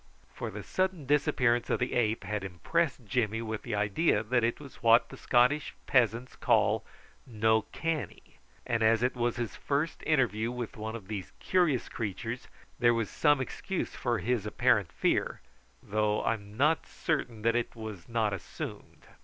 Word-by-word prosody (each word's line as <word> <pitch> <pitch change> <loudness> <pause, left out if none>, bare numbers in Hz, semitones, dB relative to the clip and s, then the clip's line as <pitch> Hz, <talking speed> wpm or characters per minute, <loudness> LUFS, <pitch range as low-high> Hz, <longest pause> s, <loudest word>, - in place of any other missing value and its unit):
For 120 - -4
the 105 -1 -7
sudden 185 - -1
disappearance 125 -4 +2
of - - +2
the 125 - -2
ape 110 -2 +1
had 105 -1 -3
impressed 130 - -1
Jimmy 110 0 0
with 110 -1 -4
the 120 -4 -3
idea 105 +4 +2
that 120 +2 +1
it 115 +1 0
was 140 -3 -12
what 115 0 +5
the - - -9
Scottish 130 +3 +2
peasants 120 -1 +2
call - - +2 0.4
"no 110 -1 +2
canny," 155 - -4 0.3
and 115 -1 0
as 110 +1 +4
it 125 - +1
was 120 -1 0
his 120 -2 -3
first 150 +3 -1
interview 120 -7 +2
with 125 -2 -5
one 110 +1 -5
of 105 -5 -8
these 95 -8 -5
curious 170 -9 +2
creatures, 115 +3 -4 0.3
there 120 -1 +5
was 115 -3 -1
some 145 -3 +3
excuse 180 +8 -3
for 120 -1 0
his 110 +2 -1
apparent - - +2
fear, - - 0 0.4
though 105 0 +1
I - - +2
am 105 -1 -9
not 150 +5 +2
certain 125 -9 -2
that 115 0 +3
it 120 0 -1
was 110 -5 -8
not 110 -3 +1
assumed. 95 - -7
115 Hz, 170 wpm, -30 LUFS, 110-130 Hz, 0.4 s, what